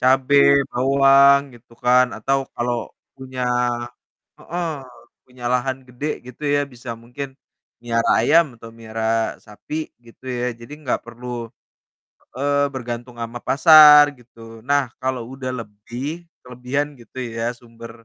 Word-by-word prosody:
cabe, 130 +2 +3 0.3
bawang 140 +2 +5
gitu 120 0 -20
kan, 125 +1 +5
atau 135 0 0 0.2
kalau 120 0 -1 0.4
punya 130 -1 -7 1.0
heeh, 175 0 -4 0.6
punya 125 -1 -15
lahan 130 +1 0
gede 125 +3 -7 0.2
gitu 125 +4 -12
ya, 145 - +2
bisa 120 0 -11
mungkin 125 +4 -6 0.5
melihara 115 -1 -1
ayam 160 +8 +5
atau 115 - -11
melihara 110 -1 -6 0.4
sapi, 105 +8 -9 0.3
gitu. 115 +2 -19 0.2
ya, 125 - -1
jadi 120 +5 -11
nggak 130 - -1
perlu 120 +1 -10 1.1
heeh, 145 +2 0 0.2
bergantung 120 -1 -6
sama 115 +1 -5
pasar 150 0 +9 0.2
gitu. 120 -1 -22 0.3
Nah 145 0 +4 0.2
kalo 130 -1 -1
udah 130 -1 -5
lebih, 115 +3 -9 0.4
kelebihan 125 +4 -3
gitu 120 - -17 0.2
ya, 115 - -2
sumber, 115 -1 -12
125 Hz, 125 wpm, -21 LUFS, 120-135 Hz, 1.1 s, pasar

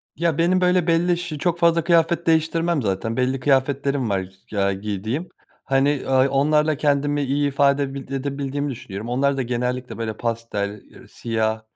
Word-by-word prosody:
Ya, 165 -2 0
benim, 180 +2 +2
böyle, 180 -1 +2
belli 170 +1 +2
ş 170 -3 -5
çok 170 +2 -1
fazla 170 -1 +3
kıyafet 170 0 +2
değiştirmem 165 0 +2
zaten 110 +2 -2
belli 130 +1 0
kıyafetlerim 135 -1 +1
var, 95 -2 0 0.2
f - - -8
ya, 100 0 +2
giydiğim. 105 - -4 0.3
Hani, 135 +1 +1
aaa, 130 0 +4
onlarla 150 +2 +2
kendimi 145 0 +1
iyi 145 +2 +1
ifade 140 0 +2
bildi 140 0 -7
edebildiğimi 140 +1 -3
düşünüyorum. 110 -2 -7
Onlar 135 +3 +1
da - - 0
genellikle, 125 +1 -3
böyle, 110 -1 -4
pastel, 110 -3 -3
eee, - - -17
siyah 110 -1 -2
140 Hz, 165 wpm, -22 LUFS, 120-155 Hz, 0.3 s, aaa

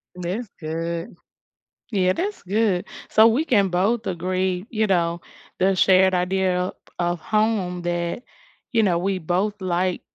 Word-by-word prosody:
That's 180 +7 -4
good. 165 +2 -4 0.8
Yeah, 185 -3 +2
that's 400 - -3
good. 200 -1 +1 0.2
So 220 +1 +6
we 245 +8 +2
can 205 - +3
both 200 +6 0
agree, 185 +1 -1
you 220 -2 0
know, 170 -3 +1 0.4
the 190 +1 +3
shared 190 0 +5
idea 180 0 +1
of 180 +1 -2 0.3
of 175 0 0
home 210 -4 0
that, 175 +3 -2 0.5
you 230 -3 +3
know, 180 -4 +2
we 190 +2 0
both 185 +5 -1
like 180 0 0
185 Hz, 140 wpm, -23 LUFS, 175-210 Hz, 0.8 s, So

